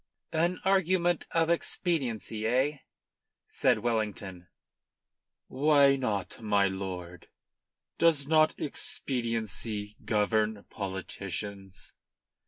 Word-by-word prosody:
"An 170 +3 +1
argument 185 -2 +2
of 165 0 +2
expediency, 125 - -1
eh?" 130 +5 +2 0.7
said - - +2
Wellington. 105 -6 -2 1.0
"Why 140 0 +4
not, 105 -7 -3
my 100 -2 +3
lord! 90 -2 -6 0.7
Does 160 -4 +4
not 155 +1 +3
expediency 115 -6 -3
govern 105 -1 +1
politicians?" 95 0 -6
110 Hz, 75 wpm, -29 LUFS, 100-150 Hz, 1.0 s, Why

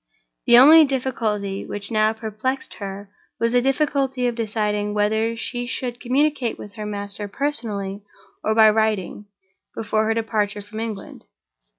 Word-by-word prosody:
The 240 -1 +9
only 310 +6 +9
difficulty 225 -8 -2
which 205 +1 -2
now 215 0 +3
perplexed 225 +4 -4
her 200 0 -7 0.3
was 230 +1 +1
the 245 - +4
difficulty 270 -1 0
of 240 - +1
deciding 210 -2 -2
whether 220 +2 0
she 245 +1 -4
should 245 -1 -4
communicate 265 -1 0
with 205 - -10
her 215 -2 -6
master 205 0 -5
personally 210 -6 -3 0.4
or 220 - 0
by 220 -1 +7
writing, 210 -2 -1 0.5
before 215 0 0
her 225 +1 0
departure 210 -2 -1
from 210 +2 -9
England. 220 -3 -7
220 Hz, 145 wpm, -22 LUFS, 205-245 Hz, 0.5 s, The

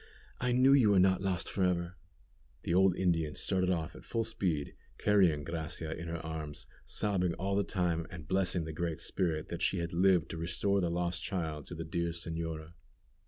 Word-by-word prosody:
I 125 0 0
knew 130 +2 +5
you 130 -7 +6
were 100 -2 +5
not 95 0 +4
lost 95 -2 -1
for 95 - -1
ever." 90 -1 0 0.7
The 85 - -1
old 95 0 +5
Indian 80 -5 +1
started 95 -2 +2
off 85 -2 -1
at - - -11
full 115 -1 -1
speed, 90 -10 -2 0.2
carrying 90 -8 +3
Gracia 80 0 -4
in 85 +1 -7
her 85 0 -3
arms, 80 -2 -5 0.2
sobbing 90 -5 0
all 100 +2 -1
the 100 - +2
time, 85 -4 -1
and 80 -4 -9
blessing 95 -2 +2
the 80 - -5
Great 85 0 -2
Spirit 80 -4 -1
that 85 0 -5
she 95 - +2
had 85 0 -3
lived 90 -1 +3
to 85 - -5
restore 90 +4 +1
the 85 - 0
lost 85 0 -1
child 80 -5 -3
to 85 - -8
the 80 0 -5
dear 85 +1 -2
señora. 80 -1 -5
85 Hz, 195 wpm, -32 LUFS, 80-95 Hz, 0.7 s, you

